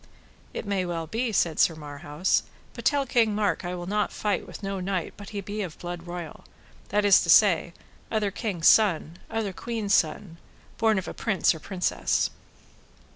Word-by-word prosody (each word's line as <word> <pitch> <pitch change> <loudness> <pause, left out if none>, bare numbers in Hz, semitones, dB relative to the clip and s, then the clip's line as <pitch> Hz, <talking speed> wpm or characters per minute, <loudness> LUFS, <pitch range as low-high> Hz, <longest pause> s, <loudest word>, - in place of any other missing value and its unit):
It - - -5
may 200 -2 0
well 170 -2 -3
be, 230 +8 -2
said 170 -6 +1
Sir 165 - +4
Marhaus; 150 +3 -1 0.3
but - - -9
tell 285 -2 +3
King 230 -4 +2
Mark 210 -2 0
I 175 +1 -3
will 175 -1 -6
not 210 +3 0
fight 210 -1 -2
with - - -10
no 195 0 -3
knight 185 -1 -2
but 205 -1 -10
he 205 -1 -4
be 205 +2 -5
of 180 -6 -5
blood 175 -1 -7
royal, 175 -2 -7 0.5
that 205 +1 +1
is 200 -2 +7
to 170 - -3
say, 175 -2 +5 0.4
other 215 -2 0
king's 190 -6 -1
son, 175 -5 +4
other 220 -4 -2
queen's 220 -1 -2
son, 165 +2 +1 0.4
born 220 -2 +3
of 190 - -3
a - - -5
prince 195 -5 +1
or 160 - -8
princess. 185 +2 0
195 Hz, 185 wpm, -26 LUFS, 175-210 Hz, 0.5 s, is